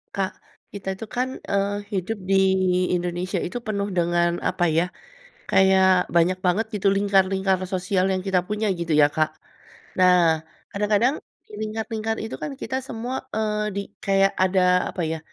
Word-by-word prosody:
Kak, 195 -1 -1 0.4
kita 190 -1 -4
itu 225 - -6
kan, 250 +4 -3
eee, 200 +1 0 0.2
hidup 195 +3 -2
di 195 +1 +2 0.6
Indonesia 180 +2 -3
itu 235 +7 -4
penuh 200 -3 -3
dengan 175 0 +1
apa 175 - 0
ya, 165 +2 +1 0.6
kayak 190 -1 +4
banyak 175 +2 +2
banget 190 +5 +2
gitu 200 -1 0
lingkar-lingkar 195 -1 +2
sosial 185 +1 0
yang 190 - 0
kita 185 -2 +2
punya 210 +3 -2
gitu 170 -1 -4
ya 150 -1 +6
Kak. 155 +1 0 0.7
Nah, 175 -3 +4 0.2
kadang-kadang 210 +6 +1 0.3
di - - -16
lingkar-lingkar 220 0 -3
itu 220 - -5
kan 295 - -5
kita 260 - -3
semua, 245 +1 -5
eee, 210 -1 -1
di 200 - -2 0.2
kayak 195 -1 +2
ada 180 -1 +3
apa - - -5
ya, 160 - -3
190 Hz, 155 wpm, -23 LUFS, 180-210 Hz, 0.7 s, ya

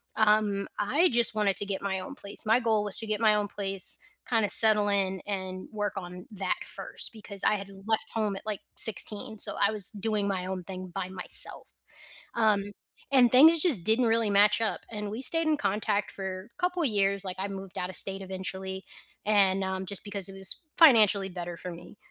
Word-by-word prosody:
um, 210 -2 +1
I 290 - +1
just 235 -3 +5
wanted 205 -2 0
to 205 - -2
get 195 -1 -4
my 190 -1 -3
own 230 +10 -9
place. 200 -4 -3
My 225 +3 +2
goal 220 -3 0
was 205 - 0
to 225 - -4
get 215 0 -2
my 215 -1 +3
own 205 -1 -2
place, 195 -2 -1 0.3
kinda 220 -4 0
settle 215 -2 +8
in 190 -2 -1
and 190 -2 -6
work 205 -1 -4
on 180 -1 -9
that 195 -2 -4
1st, - - -3
because 205 -2 -4
I - - +2
had 200 -1 -8 0.2
left 220 0 -2
home 215 -3 -1
at 195 - -10
like 210 -3 -5
16 220 +1 +2
so - - +7
I 210 - +1
was 205 -3 +3
doing 210 -1 -3
my 185 -2 -3
own 185 -1 -6
thing 185 0 -9
by 190 -2 -5
myself, 185 -1 0 0.7
um, 210 -3 0 0.4
and 245 -3 +4
things 315 +5 +6
just 265 - +6
didn't 225 +3 +2
really 225 -2 +1
match 205 +2 +3
up, 225 - -2
and 210 -2 -6
we 230 +5 -7
stayed 330 +3 -1
in 305 - +1
contact 205 +1 -2
for 190 +1 -8
couple 360 -2 -2
years, 200 -4 0
like 185 -1 -6
I 195 - -3
moved 195 -1 -9
out 180 +1 -4
of - - -11
state 195 0 0
eventually, 190 0 -7 0.4
and, 195 -2 +2
um, 190 0 -5
just 200 0 0
because 200 -2 +1
it - - -9
was 195 - +3
financially 215 - +4
better 175 -1 -7
for 180 - -8
me, 175 +4 -14
205 Hz, 205 wpm, -26 LUFS, 190-220 Hz, 0.7 s, settle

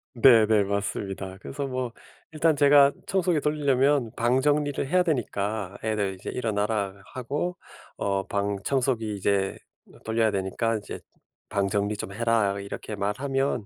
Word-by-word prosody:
네네. 110 -4 +6
맞습니다. 95 -1 -3
그래서 140 0 -4
뭐 130 -2 -3 0.4
일단 160 0 +2
제가 140 -1 +6
청소기 180 -5 +1
돌리려면 140 -4 +2
방 120 +3 +2
정리를 145 -1 +1
해야 180 +4 +3
되니까 105 - -2
애들 105 -3 -1
이제 95 - -7
"일어나라" 105 -4 -1 0.2
하고 145 +8 -3 0.4
어 100 -1 -1
"방 100 0 -1
청소기 120 -6 0
이제 95 0 0 0.5
돌려야 110 -1 +2
되니까 105 +4 -1
이제 105 - -7 0.5
방 100 -1 0
정리 100 +1 -1
좀 95 - -6
해라." 110 -3 +1
이렇게 100 +1 -6
말하면 130 +4 -1
115 Hz, 295 characters per minute, -26 LUFS, 100-140 Hz, 0.5 s, 네네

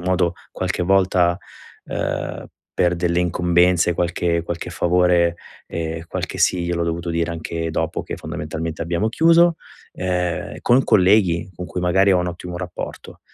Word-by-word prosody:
modo 90 -1 +1 0.2
qualche 90 -1 -2
volta, 90 -1 +3 0.5
uhm, - - -4 0.3
per 90 -1 +2
delle 85 0 +1
incombenze 90 0 +3
e - - -1
qualche 85 0 0
qualche 85 +1 -5
favore, 85 0 +2 0.3
e 80 0 -4
qualche - - -4
sì 90 -1 +2
gliel'ho 85 0 -1
dovuto 85 +1 -3
dire 85 0 -1
anche 80 0 -4
dopo - - -2
che - - -6
fondamentalmente 80 +1 -5
abbiamo 85 +6 0
chiuso. 165 +6 +5 0.4
Ehm, 90 -4 -2
con 125 +2 +4
colleghi 95 -5 +3
con 90 +1 -6
cui 90 - -4
magari 95 +3 +3
ho 90 - +4
un 90 - -1
ottimo 90 0 -6
rapporto, 90 -1 -7
90 Hz, 150 wpm, -21 LUFS, 85-90 Hz, 0.5 s, chiuso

